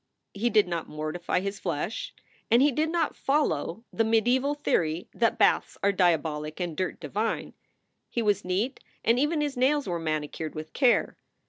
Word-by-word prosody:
He 220 +4 0
did 210 -4 +4
not 170 -2 -3
mortify 155 +4 -2
his 200 +1 -4
flesh, 205 - -3 0.4
and 240 +3 +5
he 290 - +4
did 310 +5 0
not 335 0 0
follow 225 - 0
the 225 - +2
mediaeval 245 +6 +2
theory 165 - 0
that 230 -1 +1
baths - - +2
are 200 - +4
dia 180 -4 +4
bolic 150 +1 -5
and 175 -3 -3
dirt 185 +1 -2
divine. 200 +8 -2 0.6
He 235 - -1
was 205 -2 +2
neat 200 +9 -1 0.3
and 230 +2 +4
even 300 +2 +1
his 290 -2 -1
nails 270 +2 +2
were 175 -2 -1
manicured 155 0 -3
with 155 0 -7
care. 255 -4 +2
200 Hz, 170 wpm, -27 LUFS, 165-255 Hz, 0.6 s, and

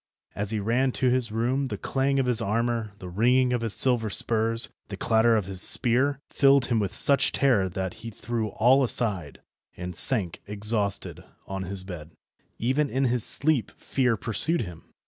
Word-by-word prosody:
As 105 0 -4
he 110 -1 0
ran 120 +6 0
to 130 -1 +1
his 125 -3 -1
room 125 +5 -1
the - - -5
clang 135 +1 -1
of 135 - +1
his 125 -2 +1
armour, 115 0 -2
the 95 - -10
ringing 125 +7 +1
of 120 - -1
his 115 -3 0
silver 120 -4 +2
spurs, 115 +2 -1 0.2
the - - -8
clatter 115 0 +2
of 105 - -2
his 95 -1 -1
spear, 130 +4 +2
filled 140 -2 +3
him 120 -2 0
with 100 -2 -3
such 140 -1 +3
terror 115 -9 +1
that 95 0 -5
he 115 - -7
threw 115 +1 -4
all 130 +6 +3
aside, 100 - 0 0.4
and 90 0 -7
sank 95 -3 +4
exhausted 105 0 -3 0.2
on 95 -1 -6
his 95 0 -2
bed. 85 -4 -10 0.4
Even 135 +5 0
in 135 +1 -1
his 125 -3 0
sleep 140 -7 +2
fear 125 -4 -1
pursued 135 - +2
him. 90 -6 -10
115 Hz, 180 wpm, -25 LUFS, 100-130 Hz, 0.4 s, sank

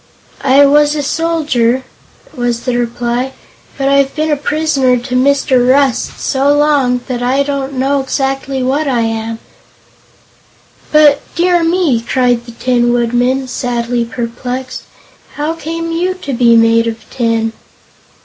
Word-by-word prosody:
"I 275 +1 +5
was 295 +1 +3
a 295 - -2
soldier," 280 -6 0 0.5
was 240 -1 -2
the 250 -2 -2
reply, 240 +2 -2 0.4
"but 275 - -1
I've 275 0 +2
been 310 0 -1
a - - +3
prisoner 290 -3 +1
to 250 +1 -6
Mr. 260 -1 +2
Rust 270 -2 +1
so 275 +1 +1
long 280 -4 +2
that 250 -2 -3
I 260 +3 +1
don't 280 -1 -3
know 270 +2 0
exactly 270 0 -2
what 280 +4 0
I 250 -4 +1
am." 225 0 -3 1.5
"But 300 -2 +5
dear 350 0 +2
me!" 330 -8 +1
cried 245 0 0
the - - -8
Tin 240 0 +1
Woodman, 245 +2 0
sadly 240 -1 -2
perplexed; 245 +2 -5 0.5
"how 300 +2 -2
came 330 0 -5
you 360 +3 -1
to 290 -7 -6
be 235 -1 +4
made 230 0 +4
of 225 0 -6
tin?" 230 -2 -1
260 Hz, 140 wpm, -14 LUFS, 240-285 Hz, 1.5 s, I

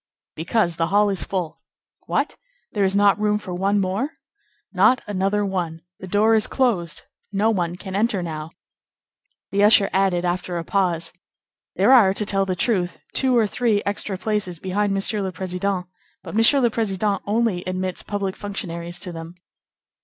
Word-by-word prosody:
"Because 170 +1 0
the 165 -1 +1
hall 205 +2 +3
is 195 - 0
full." 180 -5 -4 0.5
"What! - - -1 0.4
There 205 - 0
is 190 0 +2
not 205 0 +4
room 210 0 +2
for 190 -3 -7
one 195 +3 +1
more?" 200 +10 -1 0.6
"Not 255 +1 +4
another 205 +1 0
one. 175 -4 -3 0.2
The 190 - -8
door 210 +4 +3
is 220 -1 +5
closed. 220 -11 0 0.3
No 205 +3 +2
one 175 -4 -1
can 190 +1 -7
enter 205 -3 +1
now." 155 -2 -5 1.0
The 200 +1 +2
usher 205 -1 +6
added 185 -2 +2
after 180 0 -2
a 170 - -3
pause: 170 -3 -1 0.6
"There - - +4
are, 205 -7 +6
to 210 - +1
tell 195 -1 +1
the 185 - -1
truth, 180 -3 0 0.2
two 260 -2 +2
or 225 - +4
three 215 -1 0
extra 200 -1 -2
places 205 -4 -2
behind 195 +4 -1
Monsieur 195 +2 +1
le 190 -1 -2
Président, 185 +1 -2 0.4
but - - -8
Monsieur 225 +6 +5
le 240 -2 +3
Président 205 -2 0
only 210 -4 0
admits 185 0 -3
public 200 -2 -3
functionaries 175 -4 -5
to 180 - -4
them." 165 +1 -8
195 Hz, 170 wpm, -22 LUFS, 180-210 Hz, 1.0 s, usher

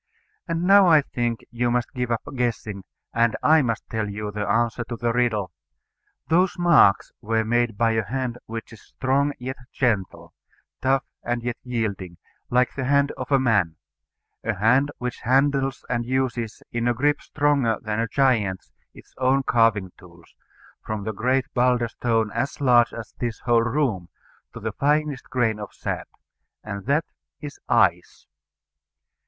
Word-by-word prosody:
And 165 0 -1
now 195 +1 +6
I 155 -4 +6
think 120 -3 -2
you 120 0 0
must 120 -1 -1
give 125 -2 -2
up 115 -1 -1
guessing, 110 -5 -2 0.3
and 115 -1 +2
I 155 0 +6
must 115 -4 -2
tell 110 -2 -2
you 105 +1 -5
the 105 0 -3
answer 115 +2 +1
to 120 - -5
the 115 0 -1
riddle. 110 -6 0 0.8
Those 180 +3 +2
marks 170 - +4
were 110 0 0
made 120 -1 +1
by 115 -1 +3
a 110 -1 +1
hand 125 0 -3
which 115 0 -7
is 110 - -14
strong 135 +2 0
and 145 - -6
yet 130 +2 -5
gentle, 110 -8 -1 0.5
tough 135 +1 +2 0.2
and 120 0 -2
yet 120 0 -3
yielding, 100 -8 -3 0.3
like 125 +1 +2
the 135 - -3
hand 140 +1 +3
of 130 +2 -7
a 135 - +6
man; 100 -11 +2 0.7
a 115 -1 -1
hand 125 +8 +3
which 125 -1 -4
handles 135 +1 +1
and 120 -1 -1
uses 120 -3 -2
in 120 0 -1
a 120 - +2
grip 145 +4 +1
stronger 140 -7 +1
than 110 0 -3
a 115 - 0
giant's 110 -7 +1 0.2
its - - -16
own 135 +1 +2
carving 115 -7 +2
tools, 85 -2 -18 0.5
from 110 -2 -4
the 110 +1 -3
great 125 +4 +1
boulder 125 -1 +2
stone 115 -2 0
as 120 +5 -3
large 120 -4 +4
as 115 -2 -8
this 120 -2 -3
whole 120 -2 +3
room 115 - -1 0.4
to - - -9
the - - -3
finest 150 -1 0
grain 115 -4 0
of 105 - -7
sand. - - -4 0.6
And 100 0 -7
that 145 +4 +2 0.3
is 145 -2 -8
ICE. - - +2
120 Hz, 165 wpm, -24 LUFS, 110-135 Hz, 0.8 s, now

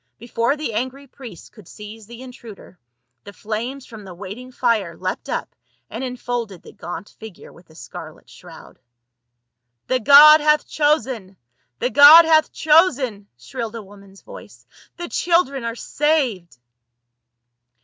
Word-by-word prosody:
Before 235 +4 -2
the 295 -7 -5
angry 260 +5 -5
priests 245 - -13
could 210 -6 -18
seize 210 0 -12
the 235 +2 -12
intruder, 230 -7 -14 0.4
the 200 - -12
flames 235 +7 -6
from 220 -2 -13
the 185 -2 -12
waiting 210 +7 -10
fire 225 -9 -2
leapt 185 0 -6
up - - -5 0.4
and - - -6
enfolded 245 -6 -6
the - - -14
gaunt 175 +2 -10
figure 220 -4 -13
with 170 0 -21
a 160 - -20
scarlet 125 -5 -12
shroud. - - -16 1.1
"The 255 - -1
god 295 +5 +7
hath 300 0 +1
chosen! 255 -10 -2 0.4
The 250 - -3
god 300 +4 +8
hath 315 -1 +2
chosen!" 280 - +1
shrilled 230 - -8
a 225 - -8
woman's 195 0 -18
voice. - - -14 0.2
" - - -29
The 345 -1 -7
children 335 -8 -1
are 230 0 -4
saved 250 - -2
235 Hz, 140 wpm, -20 LUFS, 205-280 Hz, 1.1 s, god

